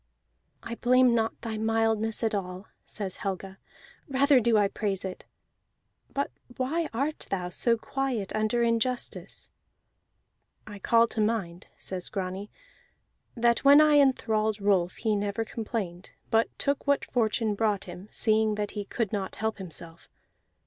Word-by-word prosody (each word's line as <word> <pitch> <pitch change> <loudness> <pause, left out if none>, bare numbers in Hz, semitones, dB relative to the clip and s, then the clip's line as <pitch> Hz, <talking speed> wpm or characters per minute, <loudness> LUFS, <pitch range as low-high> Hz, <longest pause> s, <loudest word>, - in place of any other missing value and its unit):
"I 230 - -5
blame 250 +1 +4
not 225 -1 0
thy 220 -2 -4
mildness 225 0 +1
at 225 0 +1
all," 185 -1 -4 0.2
says 195 -4 -4
Helga, 195 -1 -5 0.5
"rather 275 0 +4
do 230 -1 +3
I 205 -1 +4
praise 195 -2 -3
it. 185 - -7 0.8
But 280 - -2 0.3
why 310 +5 -1
art 280 +7 -2
thou 180 -2 -2
so 230 +6 +2
quiet 250 -4 -3
under 215 +2 +1
injustice?" 235 +2 -1 1.1
"I 205 -1 -9
call 230 +4 +4
to 220 - -2
mind," 200 -5 -2
says 185 -2 -5
Grani, 195 +1 -4 0.9
"that 235 -1 +2
when 280 +1 +8
I 305 -1 +6
enthralled 220 -6 +2
Rolf 190 -3 +2
he 220 -2 0
never 205 +2 -1
complained, 210 -6 -5 0.2
but 225 0 +3
took 280 0 -1
what 285 0 +2
fortune 220 -2 0
brought 205 -2 0
him, 195 +4 -10
seeing 215 -1 +2
that 210 0 -3
he 205 -1 -5
could 225 0 -2
not 195 -2 -3
help 220 -1 -2
himself. 170 -2 -8
220 Hz, 140 wpm, -28 LUFS, 200-235 Hz, 1.1 s, when